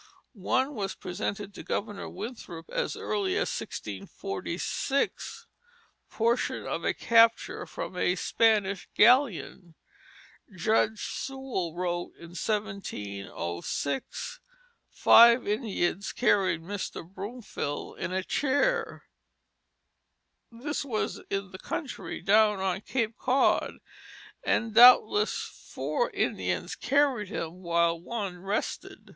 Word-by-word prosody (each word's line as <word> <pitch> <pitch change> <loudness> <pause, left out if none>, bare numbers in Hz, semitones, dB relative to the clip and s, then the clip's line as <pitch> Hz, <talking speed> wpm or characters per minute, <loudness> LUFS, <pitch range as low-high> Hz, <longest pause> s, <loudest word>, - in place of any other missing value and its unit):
One 260 +7 0
was 200 -6 -3
presented 200 +2 -4
to - - -8
Governor 205 -1 -3
Winthrop 190 -5 -8
as - - -1
early 385 -2 -1
as - - 0
1646, 370 -7 -3 0.6
portion 235 +2 0
of - - -3
a - - +2
capture 230 0 +3
from - - -6
a 180 0 +1
Spanish 200 -2 +1
galleon. 215 - +3 0.8
Judge 215 +3 +1
Sewall 265 -11 -4
wrote 175 -1 -2
in 170 - -12
1706, 140 - -4 0.5
"Five 235 0 +7
Indians 200 -3 -1
carried 190 -8 +2
Mr. 190 -2 -5
Bromfield 195 - -6
in - - -3
a 190 0 -1
chair." 450 - 0 1.5
This 280 +7 -3
was 235 -6 -2
in 195 -1 -3
the 185 - -9
country, 285 -5 -5
down 210 0 +4
on 190 0 -1
Cape 230 -1 -2
Cod, 260 +2 +2 0.7
and 225 -1 0
doubtless 220 -3 +7
four 485 0 -3
Indians - - -1
carried 270 -6 +1
him 175 -2 -5
while 170 -1 +1
one 195 -3 -4
rested. 195 +3 -4
210 Hz, 100 wpm, -28 LUFS, 180-245 Hz, 1.5 s, Five